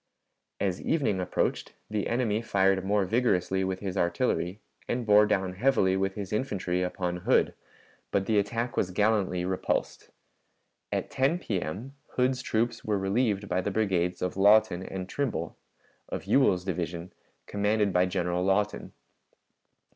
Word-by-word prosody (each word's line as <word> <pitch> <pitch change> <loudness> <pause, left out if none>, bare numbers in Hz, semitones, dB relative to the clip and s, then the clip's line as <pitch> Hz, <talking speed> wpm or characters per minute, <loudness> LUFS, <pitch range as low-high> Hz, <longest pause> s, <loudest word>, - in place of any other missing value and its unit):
As 95 -3 -1
evening 135 - 0
approached, 90 - -1
the 105 -1 -2
enemy 115 -3 0
fired 95 -3 +2
more 100 0 +1
vigorously 95 -4 +1
with 95 0 -3
his 95 -2 -4
artillery 90 0 0 0.3
and 120 0 -2
bore 105 0 +6
down 95 -3 0
heavily 95 -3 +2
with 95 0 -1
his 100 -2 -5
infantry 95 -6 -1
upon 90 -1 -2
Hood, 90 - +2 0.6
but 100 -1 0
the 105 0 +3
attack 115 +4 -2
was 90 - +1
gallantly 95 -2 +1
repulsed. 95 0 -2 0.8
At - - -2
10 135 +6 +2
P.M. 105 - -4 0.2
Hood's 130 0 +1
troops 115 -1 -1
were 105 -1 0
relieved 100 +1 0
by 90 0 0
the 95 - -2
brigades 90 -4 0
of 90 - -2
Lawton 100 -1 +4
and 95 0 -6
Trimble, 95 - -3 0.5
of - - -5
Ewell's 95 -10 +3
division, 85 -1 -4 0.3
commanded 105 -1 +1
by 90 +1 +3
General 90 -1 -1
Lawton. 100 +2 0
100 Hz, 140 wpm, -28 LUFS, 90-110 Hz, 0.8 s, bore